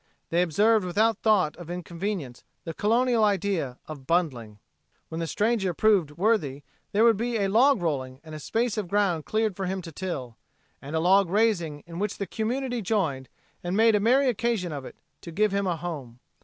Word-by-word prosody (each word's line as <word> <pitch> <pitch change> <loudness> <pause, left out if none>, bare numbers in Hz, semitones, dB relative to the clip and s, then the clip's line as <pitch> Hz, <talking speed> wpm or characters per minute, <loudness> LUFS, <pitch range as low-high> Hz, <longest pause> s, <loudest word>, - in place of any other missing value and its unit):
They 170 +1 +3
observed 210 +6 +3
without 215 +4 +1
thought 190 -9 +2
of 175 -2 -10
inconvenience 175 -5 -5 0.2
the 165 - -5
Colonial 230 +4 +2
idea 190 -10 0
of 145 -4 -9
"bundling." 130 -11 -1 0.5
When 160 - -5
the 165 - -2
stranger 205 -3 0
proved 200 -7 +3
worthy 170 -9 +1 0.3
there 210 +2 +3
would 230 -3 +5
be 235 +1 -1
a 200 -2 +1
log 240 0 +4
rolling 130 -5 -2
and 155 -1 -11
a 155 - -6
space 225 - -1
of 200 - -4
ground 185 -5 +1
cleared 215 -2 0
for 190 -1 -3
him 190 +1 -2
to 165 - -8
till, 140 -9 -5 0.4
and 145 +3 -6
a - - +2
log 185 +2 +4
raising 180 -8 +1
in 170 0 -8
which 205 0 -2
the 200 - -3
community 245 +3 -2
joined, 170 - -1 0.3
and 175 +3 -2
made 225 0 +5
a 210 - +3
merry 255 +6 +3
occasion 230 -6 0
of 140 -3 -6
it, - - -10 0.3
to 170 - -9
give 210 +5 +1
him 200 0 0
a 175 -2 0
home. 145 -8 -7
190 Hz, 195 wpm, -26 LUFS, 160-220 Hz, 0.5 s, would